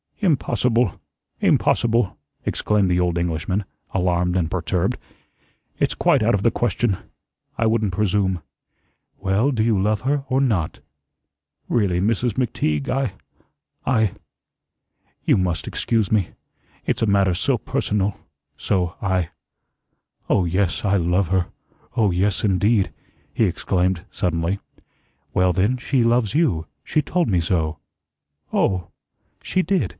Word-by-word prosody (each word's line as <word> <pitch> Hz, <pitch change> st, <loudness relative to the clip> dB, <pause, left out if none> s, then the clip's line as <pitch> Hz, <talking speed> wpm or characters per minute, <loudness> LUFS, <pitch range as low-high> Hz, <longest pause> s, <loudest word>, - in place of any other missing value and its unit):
"Impossible 125 Hz, -, +1 dB, 0.4 s
impossible!" 115 Hz, -3 st, +2 dB, 0.3 s
exclaimed 105 Hz, -3 st, +1 dB
the 90 Hz, 0 st, +2 dB
old 90 Hz, -1 st, +1 dB
Englishman, 85 Hz, +4 st, -1 dB, 0.3 s
alarmed 90 Hz, -1 st, +1 dB
and 85 Hz, -4 st, +1 dB
perturbed. 90 Hz, 0 st, 0 dB, 0.8 s
"It's -, -, +1 dB
quite -, -, +3 dB
out 110 Hz, 0 st, +3 dB
of 100 Hz, -, -2 dB
the 115 Hz, -, +4 dB
question. 115 Hz, -3 st, 0 dB, 0.6 s
I 115 Hz, -, +1 dB
wouldn't 110 Hz, -3 st, +1 dB
presume." 95 Hz, -2 st, +1 dB, 0.8 s
"Well, 100 Hz, +8 st, +2 dB
do 115 Hz, -5 st, +1 dB
you 110 Hz, -3 st, +2 dB
love 105 Hz, +2 st, +1 dB
her, 140 Hz, +1 st, 0 dB
or 130 Hz, 0 st, +2 dB
not?" 105 Hz, -, 0 dB, 0.9 s
"Really, 100 Hz, -7 st, +2 dB
Mrs. 115 Hz, +4 st, +1 dB
McTeague, 75 Hz, -, -1 dB
I 135 Hz, -6 st, 0 dB, 0.7 s
I 110 Hz, -7 st, +2 dB, 1.1 s
you -, -, +4 dB
must 90 Hz, -3 st, -1 dB
excuse 110 Hz, -4 st, 0 dB
me. 105 Hz, -5 st, +2 dB, 0.6 s
It's -, -, 0 dB
a 115 Hz, -, +2 dB
matter 100 Hz, -2 st, +3 dB
so 85 Hz, -, +1 dB
personal 100 Hz, -1 st, -1 dB, 0.4 s
so 90 Hz, -3 st, 0 dB
I 95 Hz, -4 st, 0 dB, 1.0 s
Oh, 95 Hz, -, +3 dB
yes, 90 Hz, +3 st, 0 dB
I 100 Hz, 0 st, +3 dB
love 90 Hz, +1 st, +1 dB
her. 95 Hz, 0 st, +1 dB, 0.5 s
Oh, 105 Hz, -4 st, +3 dB
yes, 95 Hz, +2 st, 0 dB
indeed," 100 Hz, +1 st, +2 dB, 0.4 s
he -, -, +3 dB
exclaimed, 90 Hz, 0 st, 0 dB
suddenly. 85 Hz, +2 st, -1 dB, 0.7 s
"Well, 90 Hz, 0 st, +3 dB
then, 100 Hz, +8 st, +2 dB
she 130 Hz, 0 st, +1 dB
loves 115 Hz, -2 st, +2 dB
you. 130 Hz, -, +2 dB, 0.2 s
She 155 Hz, -, +1 dB
told 175 Hz, +1 st, 0 dB
me 90 Hz, -5 st, +2 dB
so." 80 Hz, -2 st, -1 dB, 0.7 s
"Oh!" 90 Hz, -3 st, +1 dB, 0.5 s
"She 185 Hz, -, +1 dB
did. 190 Hz, -1 st, +1 dB
100 Hz, 130 wpm, -22 LUFS, 90-115 Hz, 1.1 s, the